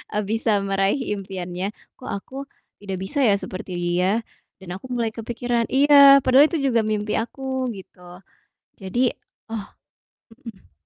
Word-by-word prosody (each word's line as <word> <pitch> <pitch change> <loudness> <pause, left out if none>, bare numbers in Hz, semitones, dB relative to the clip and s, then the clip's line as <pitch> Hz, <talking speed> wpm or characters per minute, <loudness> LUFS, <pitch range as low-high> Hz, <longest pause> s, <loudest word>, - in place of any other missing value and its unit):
eee, 210 - +1
bisa 220 +1 +1
meraih 195 +6 0 0.2
impiannya, 190 +1 -5 0.2
"Kok 255 - -10
aku 230 +7 -6 0.4
tidak 195 -2 -5
bisa 285 +10 -2
ya 200 - +4
seperti 185 -2 -6
dia?" 180 +5 0 0.4
Dan 175 -2 -9
aku 260 - -11
mulai 235 -3 -1
kepikiran, 235 +1 -2
iya, 280 0 +7
padahal 265 +4 +6
itu 335 - -4 0.2
juga 230 -1 +3
mimpi 210 0 -1
aku 260 +2 -3
gitu. 180 -1 -13 0.6
Jadi 240 +6 0 0.4
oh, 225 - -2 0.9
mhm. 210 -4 -12
215 Hz, 140 wpm, -23 LUFS, 190-255 Hz, 0.9 s, iya